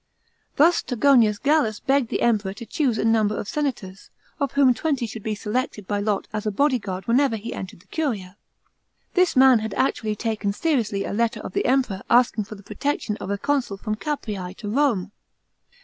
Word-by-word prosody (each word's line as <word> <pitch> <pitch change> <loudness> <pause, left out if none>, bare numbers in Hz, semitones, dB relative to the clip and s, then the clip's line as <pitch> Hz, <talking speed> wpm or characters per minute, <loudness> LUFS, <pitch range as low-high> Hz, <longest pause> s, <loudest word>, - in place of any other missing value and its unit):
Thus 335 +4 +4
Togonius 240 -4 +3
Gallus 280 -6 +1
begged 270 -3 +1
the - - -1
Emperor 210 -5 +1
to 235 - -8
choose 255 -3 0
a - - 0
number 220 -2 +2
of - - -4
senators, 220 -10 -4 0.3
of 280 -3 -1
whom 275 -3 +5
twenty 275 -1 -1
should 225 0 -7
be 215 +1 -2
selected 210 -1 -3
by 205 -1 -1
lot 205 -1 -1
as 215 0 -3
a - - +1
bodyguard 205 -7 0
whenever 245 +1 +3
he 220 +2 -6
entered 185 -3 -8
the - - -26
curia. 205 - -3 0.8
This 365 -1 +3
mnn 260 -2 +7
had 215 -2 -4
actually 220 -4 0
taken 215 -2 -2
seriously 225 -9 0
a - - -4
letter 230 +2 0
of - - -7
the - - 0
Emperor 250 -7 +1
asking 240 -3 +3
for 215 - -9
the 200 - -14
protection 280 -1 -2
of 190 - -7
a 200 - -1
consul 260 -3 -1
from 215 +2 -3
Capreas 210 - -4
to 210 -2 -5
Home. 235 -9 +1
225 Hz, 190 wpm, -23 LUFS, 205-270 Hz, 0.8 s, mnn